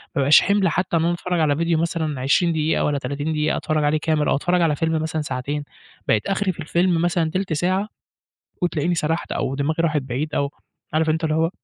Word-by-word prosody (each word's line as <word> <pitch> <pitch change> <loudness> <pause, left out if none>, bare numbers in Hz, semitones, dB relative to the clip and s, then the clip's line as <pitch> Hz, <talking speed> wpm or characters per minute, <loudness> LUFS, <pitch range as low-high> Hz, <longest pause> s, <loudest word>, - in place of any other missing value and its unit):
بابقاش 140 0 +6
حِمل 200 -2 +2
حتى 170 +1 0
إن 160 - +1
أنا 175 - +2
أتفرج 175 0 -2
على 145 -2 +2
فيديو 170 +1 +1
مثلًا 160 -4 -2
20 170 +6 +2
دقيقة 155 0 +1
والّا 145 -1 0
30 145 +3 -3
دقيقة 150 0 0
أتفرج 155 -1 -1
عليه 145 +1 +2
كامل 155 -1 0
أو - - +3
أتفرج 175 +5 +1
على 155 -3 +2
فيلم 160 0 0
مثلًا 160 0 -2
ساعتين، 145 +1 -3 0.4
بقيت 105 - +1
آخري 195 0 0
في 175 - -14
الفيلم 170 +2 +1
مثلًا 170 -2 +1
تِلت 185 -2 -2
ساعة 185 +6 0 0.7
وتلاقيني 175 0 0
سرحت 160 +1 -1
أو 135 - -2
دماغي 155 +4 -1
راحت 155 -3 +1
بعيد، 135 +4 -4
أو 140 0 0 0.4
عارف 160 0 +2
أنت 160 +1 0
اللي 155 -1 +1
هو 165 +1 +2
160 Hz, 210 wpm, -22 LUFS, 150-170 Hz, 0.7 s, بابقاش